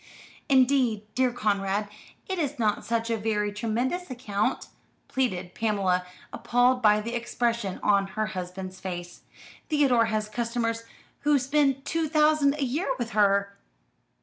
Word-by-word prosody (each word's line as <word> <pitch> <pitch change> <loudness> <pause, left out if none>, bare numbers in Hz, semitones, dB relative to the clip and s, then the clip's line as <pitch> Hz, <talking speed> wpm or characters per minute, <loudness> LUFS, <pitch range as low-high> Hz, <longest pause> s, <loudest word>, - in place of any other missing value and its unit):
"Indeed, 255 -5 +3
dear 255 -1 +2
Conrad, 205 -3 0 0.4
it 380 -2 -2
is 290 -2 -1
not 215 -3 0
such 230 0 -1
a 225 - +1
very 210 -1 -1
tremendous 245 - -2
account," 215 -5 -2 0.4
pleaded 185 -9 -2
Pamela, 190 -5 0 0.3
appalled 250 +1 +2
by 210 -2 +5
the 230 +2 -5
expression 235 -4 -1
of 200 -1 +3
her 215 +2 -2
husband's 185 -1 -6
face. 175 -1 -6 0.5
"Theodore 270 -7 +4
has 215 -1 -1
customers 230 +1 -2 0.3
who 290 0 +3
spend 275 0 +1
two 325 -2 -1
thousand 300 -2 +3
a 295 - -2
year 275 +6 -1
with 240 -2 -4
her." 200 -1 +2
230 Hz, 135 wpm, -27 LUFS, 205-260 Hz, 0.5 s, by